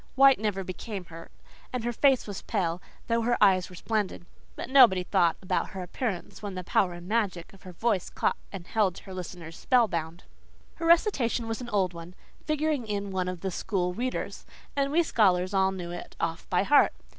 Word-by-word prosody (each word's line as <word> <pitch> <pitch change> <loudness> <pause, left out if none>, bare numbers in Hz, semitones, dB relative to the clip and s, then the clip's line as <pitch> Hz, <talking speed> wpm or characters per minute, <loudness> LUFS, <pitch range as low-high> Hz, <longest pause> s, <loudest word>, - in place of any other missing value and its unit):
White 270 -2 +7
never 205 -3 -1
became 185 +1 -6
her, 165 0 -11 0.4
and 250 -2 -3
her 240 +1 -1
face 270 +1 +3
was 205 -3 -6
pale, 180 -5 -1 0.2
though 230 0 +1
her 240 +1 +1
eyes 190 -3 +4
were 180 - -11
splendid. 210 -2 -2 0.3
But - - -5
nobody 245 -9 +6
thought 175 -3 +2
about 185 - -1
her 190 -1 -6
appearance 190 0 -4
when 205 -2 -5
the 185 - -4
power 180 +1 +1
and 175 0 -10
magic 200 -6 -1
of 195 - -17
her 185 - -10
voice 200 +1 0
caught - - 0 0.2
and 190 -3 -7
held 200 -3 +1
her 190 - -10
listeners 175 -2 -8
spellbound. 175 - +1 0.5
Her 330 - -2
recitation 280 - +3
was 225 +2 -3
an 240 - -6
old 190 -5 +1
one, 170 +1 -10 0.3
figuring 305 -5 0
in 200 -1 -3
one 185 -1 -1
of 180 -2 -4
the 190 - -2
School 180 -1 -1
Readers, 250 +6 -4 0.3
and 280 0 +1
we 340 +3 +4
scholars 185 - +2
all 190 0 +3
knew 180 -2 -6
it 175 - -8
off 165 0 -3
by 180 +1 +2
heart. 290 +7 +5
195 Hz, 195 wpm, -28 LUFS, 180-235 Hz, 0.5 s, White